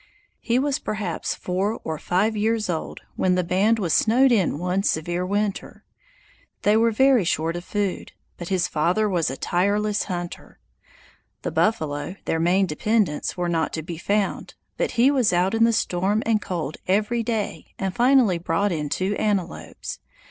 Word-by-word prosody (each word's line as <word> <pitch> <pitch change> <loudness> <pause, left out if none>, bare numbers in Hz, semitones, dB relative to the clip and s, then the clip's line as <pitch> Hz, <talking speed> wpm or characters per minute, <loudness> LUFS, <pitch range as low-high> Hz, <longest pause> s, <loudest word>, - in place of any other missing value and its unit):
He 235 +1 0
was 275 +1 0
perhaps 205 -6 -3
four 195 +5 -2
or 160 -1 -4
five 200 +6 +1
years 215 -2 0
old 160 - -5 0.2
when 185 -1 +2
the 180 - +1
band 195 +6 +2
was 180 -7 -1
snowed 250 +4 +4
in 195 -10 +2
one 180 +3 0
severe 175 -1 -1
winter. 205 0 -2 0.8
They 210 - +4
were 230 +1 +4
very 260 0 +4
short 165 -1 -1
of 175 - -5
food, 205 -3 -2 0.3
but 175 - -6
his 185 -3 +1
father 175 +8 +1
was 175 -7 0
a 135 - -5
tireless 205 +3 0
hunter. 175 -2 -6 0.9
The - - -2
buffalo, 160 -5 0
their 165 - 0
main 180 +4 +3
dependence, 190 0 0
were 175 -1 -1
not 165 -2 -1
to 160 - -3
be 165 0 -7
found, 200 +2 -1 0.2
but - - -1
he 250 +4 +5
was 255 -9 +2
out 180 +3 +2
in 225 0 +4
the 230 - +3
storm 200 0 0
and 220 -2 +2
cold 160 -6 -4
every 210 +5 +1
day 225 -2 -4
and 190 -1 -2
finally 245 -7 +4
brought 175 +4 0
in 150 -3 -2
two 190 +6 -1
antelopes. 200 -5 -3
195 Hz, 170 wpm, -23 LUFS, 175-215 Hz, 0.9 s, he